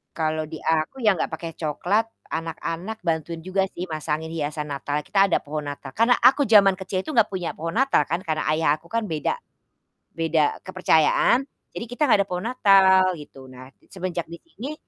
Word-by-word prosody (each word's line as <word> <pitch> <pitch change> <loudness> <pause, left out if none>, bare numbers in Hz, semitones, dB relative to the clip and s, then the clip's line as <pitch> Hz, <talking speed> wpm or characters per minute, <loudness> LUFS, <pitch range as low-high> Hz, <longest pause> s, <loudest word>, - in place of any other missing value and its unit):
Kalau 155 -1 -1
di - - -5
aku 160 +6 0
ya 215 - +5
nggak - - -2
pakai 165 +1 -5
cokelat, 175 +8 0 0.3
anak-anak 165 +5 -4
bantuin 165 0 -2
juga 185 +1 0
sih 175 - -4
masangin 155 +1 -3
hiasan 150 -1 -3
Natal. 145 +1 -3
Kita 195 +3 +3
ada 185 - +2
pohon 150 0 -5
Natal, 145 -2 -7
karena 230 - +3
aku 270 +3 +4
zaman 200 -3 +6
kecil 190 0 -3
itu - - -5
nggak 225 -2 +5
punya 180 -3 -3
pohon 165 +2 -4
Natal 265 - +3
kan 170 +3 -1
karena 155 -1 -1
ayah 160 -1 +1
aku 170 - -20
kan 230 +2 -1
beda 155 - -1 0.8
beda 160 -2 +1
kepercayaan, 185 - +3 0.2
jadi - - -6
kita 245 +5 -11
nggak 210 - +6
ada - - -32
pohon 180 +3 -4
Natal, 195 -6 +5 0.2
gitu. 135 -2 -13
Nah, 130 0 -12 0.2
semenjak 180 -3 -4
di 170 +1 -10
sini 295 -2 -8
170 Hz, 185 wpm, -24 LUFS, 155-195 Hz, 0.8 s, zaman